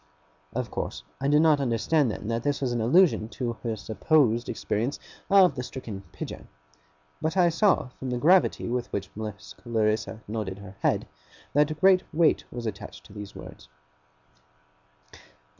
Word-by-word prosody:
Of 125 0 -3
course - - -4 0.2
I 140 - 0
did 150 +2 +5
not 155 -3 +5
understand 130 +3 +2
then 105 - -5
that 115 0 -1
this 145 +2 0
was 130 -3 -1
an 120 -1 -1
allusion 130 - +4
to 120 -3 -1
her 115 -2 -2
supposed 120 +2 +1
experience 120 +7 -2 0.3
of 195 -5 +6
the 130 - -4
stricken 115 -6 -7
Pidger; - - -7 0.7
but 160 +4 -1
I 175 -2 +5
saw, 170 -5 +2
from 130 - -4
the 125 - -1
gravity 175 +8 +3
with 120 0 -2
which 100 -2 -4
Miss 105 -3 -7
Clarissa 110 -1 -1
nodded 105 -3 -4
her 100 -1 -11
head, - - +1 0.5
that 150 +2 +2
great 190 0 +6
weight 165 0 +3
was 120 -1 -6
attached 90 -8 -7
to 95 - -15
these 105 -2 -8
words. - - -11
120 Hz, 160 wpm, -27 LUFS, 110-155 Hz, 0.7 s, of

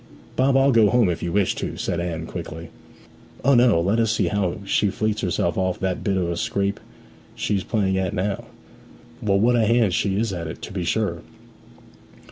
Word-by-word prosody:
'Bob, 135 +1 +3
I'll 135 +1 +4
go 115 -4 +5
home 120 -6 +3
if 85 - -2
you 85 - -2
wish 100 -1 +2
to,' - - -5
said 85 - -2
Anne 85 -2 -3
quickly. 85 -1 -7 0.8
'O 140 - +5
no 120 -7 +5
let 100 +7 +1
us 115 -2 +2
see - - +1
how 100 -4 -1
she 100 +1 +2
fleets 110 +2 -1
herself 85 0 0
off 95 -1 -1
that 95 -1 -2
bit 100 -2 0
of 90 -2 0
a 85 - -3
scrape 100 -3 -1 0.6
she's 100 -3 -1
playing 95 -4 0
at 95 -2 -1
now. 100 0 -2 0.8
Well, 100 -2 +2
what 120 +4 +3
a 115 -2 +3
hand 115 -5 +3
she 95 +3 0
is 110 -3 -1
at 85 -2 -4
it, 80 - -7
to - - -7
be 90 -3 -3
sure!' 85 -3 -1
100 Hz, 200 wpm, -23 LUFS, 90-110 Hz, 0.8 s, go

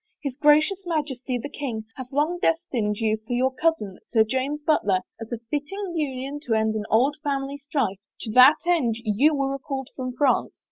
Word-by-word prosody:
His 280 -3 -2
Gracious 305 +7 +3
Majesty, 275 -6 -2
the 245 - -5
king, 245 -7 -5
hath 255 -1 -8
long 305 +5 0
destined 245 - 0
you 220 -1 +1
for 220 +3 -7
your 260 +2 +1
cousin, 260 - -1
Sir 225 -2 +4
James 265 +6 -2
Butler, 205 -12 +2 0.2
as 225 0 -8
a 235 - -2
fitting 355 +6 -3
union 275 -2 -3
to 225 - +2
end 220 0 +1
an 215 -1 -3
old 265 +7 +3
family 280 -1 -2
strife.. 275 - -2 0.2
To 220 - -5
that 255 +6 +8
end 310 -11 +2
you 245 +8 +3
were 275 -1 0
recalled 270 -1 -5
from 255 -1 -4
France." 275 -2 +1
270 Hz, 185 wpm, -24 LUFS, 230-295 Hz, 0.2 s, that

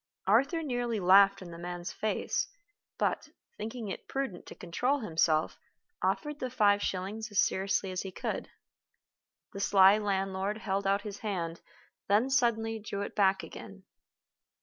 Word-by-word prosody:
Arthur 275 - +3
nearly 245 -5 -1
laughed 195 +1 +6
in 175 - -10
the 170 - -9
man's 175 0 -5
face; 215 - -1 0.5
but, - - -1 0.3
thinking 225 +1 -5
it 195 - -6
prudent 270 -10 -4
to - - -9
control 250 +11 -1
himself, 160 -5 +1 0.4
offered 295 -1 -1
the 255 - -3
five 205 -4 +3
shillings 200 +5 -3
as 205 - -6
seriously 190 0 +1
as 185 - -2
he 190 - -6
could. - - -4 1.0
The 195 - -6
sly 195 +1 +6
landlord 195 0 -1
held 195 -2 -2
out 200 +1 +2
his 205 -1 -7
hand, 170 -6 -3 0.5
then 220 +7 +3
suddenly 225 -4 +1
drew 200 -1 -4
it - - -6
back 195 -2 +3
again. 195 -2 -10
200 Hz, 150 wpm, -30 LUFS, 190-225 Hz, 1.0 s, laughed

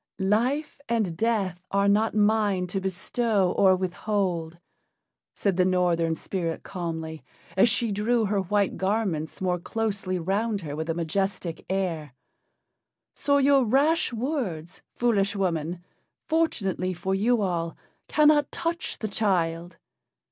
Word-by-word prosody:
"Life 280 +7 0
and 215 -8 0
death 195 -3 0
are 200 0 +2
not 215 +3 +2
mine 210 -3 +2
to 190 +2 -3
bestow 195 +1 0
or 195 - +4
to 185 - +6
withhold," 180 -3 -2 0.8
said 195 -3 0
the 185 - +5
Northern 175 -3 +2
spirit 165 -1 -3
calmly, 160 -3 -5 0.3
as 195 +5 +5
she 230 -1 0
drew 220 +3 +1
her 200 0 +1
white 200 +2 0
garments 190 -6 -1
more 180 -1 0
closely 200 -2 -2
round 200 +4 -1
her 145 -3 -5
with 160 +2 -4
a 165 - 0
majestic 175 +1 -2
air. 165 -8 -2 1.0
"So 285 0 +2
your 275 -1 +5
rash 280 +8 +2
words, 230 - -3
foolish 205 -4 +1
woman, 175 -2 -2 0.4
fortunately 195 - 0
for 190 +3 -2
you 220 +3 +2
all, 170 -3 -2 0.3
cannot 300 -1 +4
touch 335 +1 -2
the 215 - -3
child. 175 -5 -1
195 Hz, 130 wpm, -26 LUFS, 175-225 Hz, 1.0 s, to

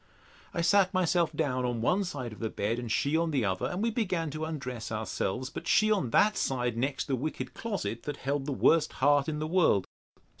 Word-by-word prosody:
I 170 - -2
sat 195 +2 +3
myself 175 -3 +2
down 130 -4 -1
on 120 -2 -1
one 180 - +2
side 130 -9 -5
of - - -12
the 110 - -2
bed, 110 +3 -2
and 120 -2 -5
she 140 +7 +1
on 165 0 +2
the 135 -7 +1
other, 95 -1 -1
and 185 +4 -3
we 230 - +1
began 185 -9 -1
to 155 +2 -3
undress 125 -8 -5
ourselves; 110 +3 -2
but - - -7
she 215 +1 +4
on 190 - +1
that 210 - +4
side 120 -3 0
next 135 +4 -1
the 135 - 0
wicked 150 +5 -4
closet, 200 - -4
that 145 -1 -4
held 140 +1 -2
the - - -1
worst 160 +4 +3
heart 145 +2 +3
in 150 - -2
the 155 - -2
world. 155 - +3
145 Hz, 220 wpm, -29 LUFS, 120-170 Hz, -, she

